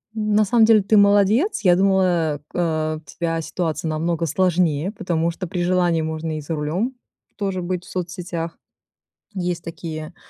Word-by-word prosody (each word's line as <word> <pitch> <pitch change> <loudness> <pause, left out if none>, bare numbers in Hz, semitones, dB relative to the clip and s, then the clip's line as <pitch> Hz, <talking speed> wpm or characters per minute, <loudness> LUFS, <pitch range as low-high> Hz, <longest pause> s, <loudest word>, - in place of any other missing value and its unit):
На 215 -1 +2
самом 225 +2 +4
деле, 220 -2 +5
ты 205 +3 +2
молодец. 205 - +4
Я 180 -3 +6
думала, 180 -5 +2
э, - - -9
э, 155 -2 0
у - - -10
тебя 165 +2 -3
ситуация 165 -1 -3
намного 165 +1 -1
сложнее, 175 -1 +1
потому 170 -5 -1
что 180 +2 -6
при 175 +1 -2
желании 175 -2 +2
можно 160 0 -3
и - - -5
за 150 +3 -5
рулем 165 - -1 0.4
тоже 195 -2 -2
быть 180 0 -3
в - - -14
соцсетях. 175 -2 -4 0.8
Есть 175 -2 -2
такие, 160 0 -7
175 Hz, 165 wpm, -22 LUFS, 160-190 Hz, 0.8 s, Я